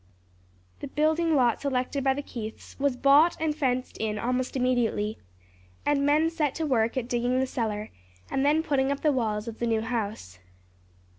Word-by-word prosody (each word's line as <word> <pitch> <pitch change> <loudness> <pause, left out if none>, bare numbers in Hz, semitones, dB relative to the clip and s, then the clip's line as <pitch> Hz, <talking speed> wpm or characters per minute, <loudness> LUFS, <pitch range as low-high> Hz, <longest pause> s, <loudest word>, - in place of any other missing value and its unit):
The - - -6
building 315 +3 +1
lot 245 -4 +2
selected 270 0 -1
by 265 0 +2
the 285 - -4
Keiths 220 -5 -8
was 280 -2 +1
bought 285 +6 +5
and 315 -1 0
fenced 255 -4 -1
in 215 -1 -1
almost 250 +4 -1
immediately, 240 -4 0 0.7
and 290 -1 +2
men 305 +3 +3
set 305 -5 -1
to 320 - -2
work 235 -4 +1
at 245 -2 -2
digging 245 +1 0
the 265 - +2
cellar, 220 -4 -3 0.4
and 270 - 0
then 300 +3 +3
putting 275 -3 +1
up 280 - -3
the 305 - +3
walls 220 -4 -1
of 225 -1 -7
the 235 - 0
new 225 -1 +1
house. 215 - -4
255 Hz, 175 wpm, -27 LUFS, 230-290 Hz, 0.7 s, bought